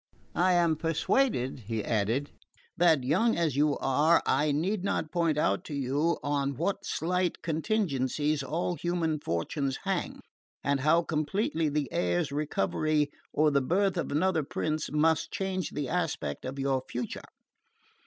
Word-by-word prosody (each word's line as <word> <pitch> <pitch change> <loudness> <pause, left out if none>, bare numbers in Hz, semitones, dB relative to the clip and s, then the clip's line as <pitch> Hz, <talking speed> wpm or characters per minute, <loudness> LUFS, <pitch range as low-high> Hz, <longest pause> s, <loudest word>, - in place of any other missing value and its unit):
I 180 +2 +3
am 170 -3 +3
persuaded," 165 - +1
he 110 -2 -2
added, 115 +6 0 0.4
"that, 165 -6 +4
young 185 - +2
as 165 -6 +1
you 145 0 +2
are, 150 +5 +3
I 145 +3 +2
need 180 +7 0
not 195 -6 -1
point 165 -3 +1
out 100 -10 +1
to 145 - -5
you 140 +5 0
on 140 -2 -1
what 200 - -1
slight 180 +2 -1
contingencies 155 - 0
all 160 +6 -2
human 170 -3 -1
fortunes 135 - -2
hang, - - -2 0.4
and 140 0 +1
how 155 +5 +3
completely 160 +1 0
the 145 -1 -1
heir's 90 +6 0
recovery 150 +1 0 0.2
or 155 0 +3
the 140 -1 +3
birth 190 +8 +1
of 170 - -2
another 165 +3 +2
prince 155 +2 -2
must 160 +2 +2
change 190 -3 -2
the 145 -2 -3
aspect 150 - -2
of 130 +2 -5
your 135 -1 0
future. 120 -1 -5
155 Hz, 145 wpm, -29 LUFS, 140-170 Hz, 0.4 s, that